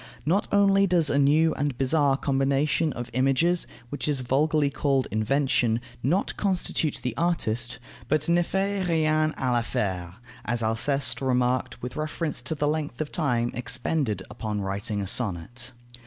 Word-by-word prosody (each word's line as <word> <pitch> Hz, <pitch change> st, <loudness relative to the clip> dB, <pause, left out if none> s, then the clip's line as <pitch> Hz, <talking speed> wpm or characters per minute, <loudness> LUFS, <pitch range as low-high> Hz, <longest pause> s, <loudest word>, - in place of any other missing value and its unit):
Not 185 Hz, +7 st, +1 dB
only 200 Hz, -1 st, +4 dB
does 170 Hz, -5 st, +3 dB
a 140 Hz, -, +2 dB
new 155 Hz, +3 st, +4 dB
and 145 Hz, -3 st, -2 dB
bizarre 140 Hz, 0 st, +2 dB
combination 140 Hz, +3 st, +1 dB
of 120 Hz, 0 st, -6 dB
images, 135 Hz, +8 st, +2 dB, 0.2 s
which 145 Hz, -, -3 dB
is 145 Hz, -3 st, +1 dB
vulgarly 145 Hz, +3 st, +1 dB
called 135 Hz, -1 st, 0 dB
invention, 115 Hz, 0 st, +1 dB, 0.2 s
not 175 Hz, +10 st, 0 dB
constitute 180 Hz, -6 st, 0 dB
the 125 Hz, -2 st, -2 dB
artist, 125 Hz, -8 st, 0 dB, 0.3 s
but 155 Hz, -1 st, +1 dB
ne 170 Hz, +1 st, +4 dB
fait 195 Hz, +1 st, -1 dB
rien 155 Hz, -1 st, +2 dB
à 130 Hz, -2 st, -1 dB
l'affaire, 95 Hz, -7 st, -2 dB, 0.3 s
as 115 Hz, +1 st, -1 dB
Alceste 115 Hz, +2 st, +1 dB
remarked 125 Hz, -2 st, 0 dB
with 125 Hz, -, -5 dB
reference 155 Hz, -2 st, -3 dB
to 140 Hz, +6 st, -3 dB
the 145 Hz, 0 st, 0 dB
length 150 Hz, -5 st, -2 dB
of 155 Hz, -1 st, -3 dB
time 120 Hz, -7 st, 0 dB
expended 125 Hz, -, -1 dB
upon 105 Hz, -1 st, -4 dB
writing 100 Hz, +1 st, -2 dB
a -, -, -3 dB
sonnet. 120 Hz, +4 st, 0 dB
135 Hz, 150 wpm, -26 LUFS, 120-155 Hz, 0.3 s, only